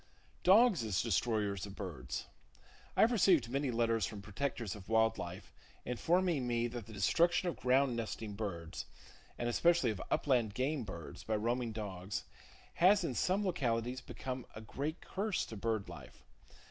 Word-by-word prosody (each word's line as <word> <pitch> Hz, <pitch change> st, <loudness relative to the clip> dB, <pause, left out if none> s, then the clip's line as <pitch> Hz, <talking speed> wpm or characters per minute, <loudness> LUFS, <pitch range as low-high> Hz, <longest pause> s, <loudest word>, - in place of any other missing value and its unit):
Dogs 200 Hz, -, +6 dB
As 105 Hz, -5 st, 0 dB
Destroyers 105 Hz, -3 st, 0 dB
Of 100 Hz, -, -10 dB
Birds. 80 Hz, -12 st, -5 dB, 0.7 s
—I -, -, +5 dB
have 225 Hz, -, +6 dB
received 175 Hz, -, +4 dB
many 140 Hz, +1 st, 0 dB
letters 115 Hz, -1 st, +1 dB
from 105 Hz, -2 st, -7 dB
protectors 110 Hz, +1 st, -3 dB
of 105 Hz, -1 st, -11 dB
wild 110 Hz, 0 st, +3 dB
life 90 Hz, +1 st, -7 dB, 0.3 s
informing 160 Hz, +2 st, +1 dB
me 120 Hz, -1 st, +1 dB
that 115 Hz, -3 st, -7 dB
the -, -, -10 dB
destruction 170 Hz, -, +3 dB
of 175 Hz, -, -1 dB
ground 130 Hz, 0 st, +2 dB
nesting 110 Hz, -1 st, -4 dB
[Page 100 Hz, -, -9 dB
77] 100 Hz, -6 st, -2 dB
birds, 80 Hz, -, -6 dB, 0.5 s
and 120 Hz, -, -2 dB
especially 165 Hz, 0 st, +3 dB
of 100 Hz, -, -5 dB
upland 120 Hz, -7 st, +1 dB
game 135 Hz, +1 st, 0 dB
birds, 85 Hz, -5 st, -8 dB
by 110 Hz, -, -1 dB
roaming 120 Hz, +2 st, 0 dB
dogs, 100 Hz, -3 st, -4 dB, 0.5 s
has 190 Hz, +2 st, +5 dB
in 145 Hz, -, -1 dB
some 190 Hz, -, +1 dB
localities 125 Hz, -7 st, -1 dB
become 130 Hz, -1 st, -6 dB
a 110 Hz, -, -7 dB
great 145 Hz, +9 st, -4 dB
curse 200 Hz, 0 st, -2 dB
to 110 Hz, -, -8 dB
bird 110 Hz, -1 st, -1 dB
life. -, -, -11 dB
120 Hz, 165 wpm, -34 LUFS, 105-145 Hz, 0.7 s, Dogs